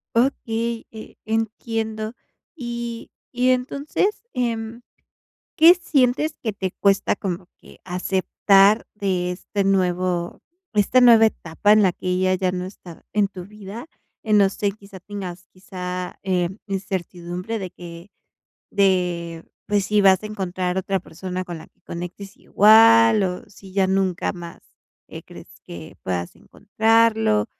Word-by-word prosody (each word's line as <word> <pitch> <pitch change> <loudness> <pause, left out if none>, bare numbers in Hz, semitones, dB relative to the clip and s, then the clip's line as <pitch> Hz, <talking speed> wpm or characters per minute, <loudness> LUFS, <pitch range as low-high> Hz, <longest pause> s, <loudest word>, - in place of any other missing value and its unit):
Okey, 230 -2 0
eh, 220 -1 -11
entiendo. 220 0 -3 0.4
Y 235 -4 -6 0.2
y 250 0 +1
entonces, 280 +10 -1
em, 230 -1 -3 0.7
¿qué 330 +2 +9
sientes 300 -3 +1
que 220 -3 -2
te 190 -2 -3
cuesta 200 -1 +2
como 180 -2 -4
que - - -18
aceptar 195 +3 +2
de 185 -3 -1
este 200 +2 -3
nuevo 180 -2 0 0.3
esta 215 +4 +3
nueva 230 -2 +7
etapa 205 0 +1
en 215 - +5
la 190 - +4
que 180 - -8
ella 185 +1 +1
ya 185 -1 0
no 180 0 -3
está 185 -3 -12
en 210 -1 +2
tu 185 -2 -10
vida?, 210 - -10 0.4
eh, 220 - -4
no 205 -2 +6
sé, 200 +1 -2
quizá 200 -2 -14
tengas 185 -3 -8
quizá, 180 -1 -6
em, 185 +1 -1
incertidumbre 185 +1 -4
de 190 -2 -5
que 170 +1 -11 0.6
de 175 -4 0 0.2
pues, 205 -2 +1
si 210 0 +2
vas 190 -1 +5
a - - -5
encontrar 185 -3 -3
otra 195 +1 -1
persona 185 +2 -6
con 175 -2 -7
la 160 - -12
que - - -34
conectes 180 +3 -8
igual 225 +1 +6
o 180 -1 -3
si 195 -1 -15
ya 195 -1 +3
nunca 190 -2 0
más, 170 -2 -10 0.5
eh, - - -9
crees - - -13
que 85 -2 -10
puedas 90 -2 -3
encontrarlo, 220 - +1
195 Hz, 140 wpm, -22 LUFS, 180-225 Hz, 0.7 s, qué